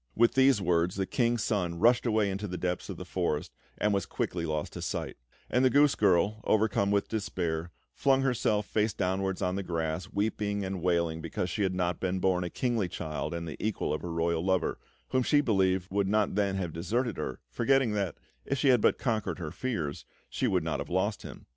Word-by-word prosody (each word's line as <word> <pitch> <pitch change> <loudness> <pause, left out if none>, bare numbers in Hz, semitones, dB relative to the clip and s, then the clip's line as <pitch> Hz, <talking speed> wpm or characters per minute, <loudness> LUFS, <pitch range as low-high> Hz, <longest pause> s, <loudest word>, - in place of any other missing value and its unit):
With 120 +1 +4
these 135 -3 +5
words 85 -1 +1
the 95 0 0
King's 120 +1 +1
Son 90 -6 -1
rushed 120 +6 +4
away 110 -3 +2
into 100 +2 -3
the 90 -1 -4
depths 90 -1 -2
of - - -5
the - - -7
forest, - - -2 0.2
and 105 - +1
was 100 -2 0
quickly 85 -2 -2
lost 75 -1 -2
to - - -6
sight; - - -3 0.3
and 125 - +2
the 130 - +6
goose 145 +2 +5
girl, 100 +2 +2
overcome 105 -2 +2
with 100 0 +1
despair, 85 -6 -2 0.2
flung 135 -1 +2
herself 110 -5 +1
face 105 0 0
downwards 95 0 -1
on 90 +1 0
the - - -1
grass, 85 -1 -2
weeping 100 -1 -1
and 95 -1 -4
wailing 85 -2 +1
because 85 +2 -3
she 105 - -2
had 95 -2 +1
not 90 -1 -1
been 95 0 -1
born 90 -1 +2
a 90 - -3
kingly 120 -4 0
child 75 -3 -4
and 85 0 -4
the 75 - -7
equal 110 -1 -1
of - - -3
her 85 - -5
royal 85 0 0
lover, 95 0 0 0.3
whom 130 - +2
she 145 +4 +3
believed 95 -8 +2
would 100 0 +1
not 105 0 +2
then 100 -1 +1
have 90 -4 -3
deserted 110 +7 -1
her, - - -4
forgetting 130 - +2
that, 100 -5 -1 0.3
if 140 - -2
she 140 - +3
had 125 -4 +5
but - - +3
conquered 115 -4 -1
her 80 -4 -5
fears, 85 - -3 0.3
she 130 - 0
would 95 -6 +1
not 80 - -2
have - - -5
lost 95 +4 0
him. - - -10
95 Hz, 215 wpm, -29 LUFS, 90-110 Hz, 0.3 s, the